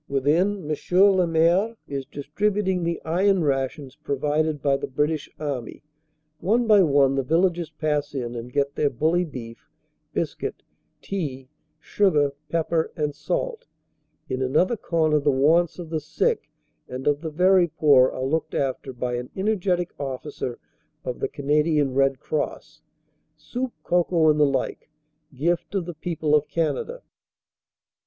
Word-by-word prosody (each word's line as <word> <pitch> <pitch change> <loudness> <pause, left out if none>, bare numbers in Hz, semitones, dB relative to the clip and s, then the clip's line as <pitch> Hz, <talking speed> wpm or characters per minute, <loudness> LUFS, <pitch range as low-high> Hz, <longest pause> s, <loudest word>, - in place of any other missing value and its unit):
Within 160 +7 +1
M. 150 - -5
le 190 -3 +5
Maire 170 +7 +2
is 135 -2 -4
distributing 190 +7 -1
the 170 0 -1
iron 185 +3 +2
rations 135 -1 -2
provided 150 +2 -1
by 140 0 +2
the - - -3
British 150 +3 -1
Army. 140 -6 -5 0.6
One 230 +7 +2
by 210 -3 +6
one 140 -5 +4
the 135 - +1
vil 165 +7 +2
lagers 175 -3 0
pass 150 -2 -1
in 120 -3 -3
and 120 +1 -7
get 140 +1 0
their 145 - +1
bully 160 +8 +1
beef, 115 -7 -10 0.4
biscuit, - - -3 0.4
tea, 135 -9 -4 0.3
sugar, 150 -9 +2 0.2
pep 165 -1 -1
per 160 -1 +1
and 150 -2 -1
salt. 480 - -3 0.6
In 130 0 -3
another 155 - +2
corner 160 -6 +1
the 145 - +1
wants 155 +6 +3
of 170 -3 -8
the 160 - 0
sick 155 +1 -1 0.4
and 130 +1 -6
of 145 0 +2
the 165 - -4
very 180 +3 +4
poor 140 -5 +5
are 130 - -4
looked 160 +4 -1
after 135 -1 -2
by 125 0 -2
an 125 +1 -6
energetic 190 -3 0
officer 135 -2 -5 0.5
of 125 - -4
the - - 0
Canadian 150 -1 +1
Red 135 0 +2
Cross 155 +1 -4 0.6
soup, 245 +12 -4
cocoa, 170 -2 +3
and 150 - 0
the 150 - +5
like, 135 +1 -2 0.5
gift 170 +8 -1
of 190 -3 0
the 175 - -6
people 160 -1 -2
of 150 -1 +3
Canada. 170 - -2
150 Hz, 150 wpm, -24 LUFS, 140-175 Hz, 0.6 s, by